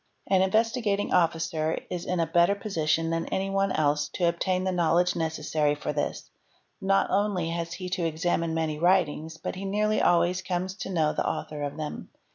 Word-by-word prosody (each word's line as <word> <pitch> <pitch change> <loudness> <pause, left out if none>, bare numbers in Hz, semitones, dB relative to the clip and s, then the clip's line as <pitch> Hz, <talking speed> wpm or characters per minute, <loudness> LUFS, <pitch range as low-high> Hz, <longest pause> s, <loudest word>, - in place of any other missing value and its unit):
An 190 -1 +3
Investigating 215 +1 +1
Officer 165 -2 +1
is 175 -1 -3
in 180 -1 0
a 165 - +3
better 175 +4 +3
position 165 -5 0
than 165 0 -1
any 195 +1 -2
one 195 0 +1
else 145 -1 +1
to 175 - +2
obtain 180 +2 0
the 190 - 0
knowledge 175 0 +2
necessary 155 -2 0
for 150 - -4
this, 145 -1 -3 0.5
not 195 0 +2
only 190 -4 +1
has 170 0 -3
he 185 - -6
to 180 -2 -1
examine 165 0 -1
many 155 -2 -1
writings, 160 -3 +1
but 160 - -4
he 190 - -7
nearly 210 +2 +1
always 175 +1 +3
comes 185 0 -2
to - - -5
know 160 -5 +1
the - - 0
author 150 -1 -4
of 145 +1 -4
them. 155 -1 -5
170 Hz, 185 wpm, -27 LUFS, 160-190 Hz, 0.5 s, An